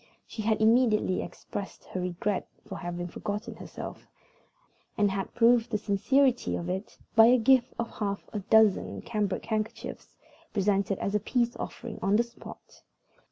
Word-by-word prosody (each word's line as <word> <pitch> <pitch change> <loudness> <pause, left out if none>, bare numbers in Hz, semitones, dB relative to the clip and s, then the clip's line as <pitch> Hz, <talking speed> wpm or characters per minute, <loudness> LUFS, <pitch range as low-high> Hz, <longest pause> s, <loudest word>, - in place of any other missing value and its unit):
She 220 - -6
had 215 0 +1
immediately 220 -4 +3
expressed 200 -1 -7
her 185 - -4
regret 180 +3 -2 0.2
for - - -7
having 175 0 -4
forgotten 205 +4 -5
herself, - - -8 0.9
and 205 -2 +3
had 195 0 -3
proved 235 0 +4
the 215 - 0
sincerity 245 +6 +2
of 170 - -4
it 190 +4 -4 0.2
by 225 0 +9
a 250 +1 +6
gift 250 +1 +3
of 235 0 -3
half 200 -2 -2
a 210 - -1
dozen 215 0 +3
cambric 210 -4 -2
handkerchiefs, 220 0 -4 0.4
presented 195 -1 +1
as 200 - -2
a 210 - +3
peace 240 +3 0
offering 235 -3 -6
on 195 +2 +2
the 235 - +4
spot. 235 0 -13
210 Hz, 155 wpm, -28 LUFS, 195-235 Hz, 0.9 s, by